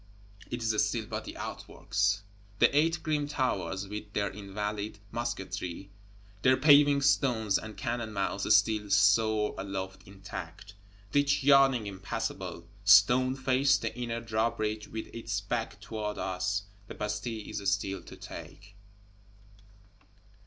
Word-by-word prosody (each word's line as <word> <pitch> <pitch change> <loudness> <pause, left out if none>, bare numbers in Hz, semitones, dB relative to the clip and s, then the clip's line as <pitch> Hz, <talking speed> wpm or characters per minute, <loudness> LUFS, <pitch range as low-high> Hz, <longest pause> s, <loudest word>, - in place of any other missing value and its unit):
it 120 -1 -4
is 110 -2 +2
still 110 0 -2
but 110 -1 -5
the - - -8
outworks. 105 -1 -2 0.3
The - - +4
Eight 165 +3 +2
Grim 150 -2 0
Towers, 100 -8 -1
with 105 0 -7
their 100 -1 0
Invalide 105 +1 -4
musketry, 95 -5 -4 0.5
their 130 +3 +5
paving 145 0 +6
stones 120 -7 +2
and 110 0 -9
cannon 120 -2 -3
mouths, 100 0 -1
still 105 0 +2
soar 105 +2 +3
aloft 95 -1 -5
intact; 95 0 -9 0.4
Ditch 145 -1 +2
yawning 135 -4 +5
impassable, 95 -3 -5 0.2
stone 120 +6 +6
faced; 130 0 +2
the 115 -1 -3
inner 120 -1 -3
Drawbridge 110 -1 -1
with 110 0 -5
its 115 -3 -3
back 105 +1 -3
toward 105 -1 -4
us; 95 +2 -1 0.2
the - - -8
Bastille 105 +1 -4
is 100 -1 -1
still 100 -1 -2
to - - -12
take! 100 +1 -11
105 Hz, 125 wpm, -30 LUFS, 100-120 Hz, 0.5 s, paving